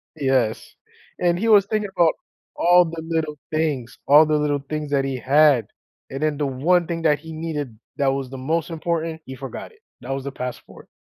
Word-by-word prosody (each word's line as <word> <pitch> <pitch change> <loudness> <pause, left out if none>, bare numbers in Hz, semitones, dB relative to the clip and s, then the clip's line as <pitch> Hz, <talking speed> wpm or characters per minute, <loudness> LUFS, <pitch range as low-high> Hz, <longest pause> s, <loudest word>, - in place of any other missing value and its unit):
Yes, 130 -6 0 0.4
and 175 0 +1
he 225 - 0
was 205 -3 +6
thinking 210 -1 -2
about 170 -2 +4 0.4
all 175 +1 +5
the 165 0 -6
little 155 -2 -2
things 150 -6 -2
all 150 +3 +8
the 155 0 +1
little 145 -1 0
things 150 -1 -4
that 135 -1 +2
he 135 -1 -2
had, 140 -1 +4 0.4
and 135 +2 -6
then 155 -2 0
the 145 - 0
one 165 +7 +2
thing 165 -1 -3
that 150 -2 +3
he 160 +1 -10
needed 150 -8 -5 0.2
that 140 - +1
was 135 -2 -3
the 135 - -8
most 160 +6 -1
important, 165 -1 -3
he 130 - -8
forgot 135 - -8
it. 440 - -24 0.2
That 130 - -6
was 135 0 -3
the 140 - -4
passport. 125 -2 -8
150 Hz, 200 wpm, -22 LUFS, 135-165 Hz, 0.4 s, all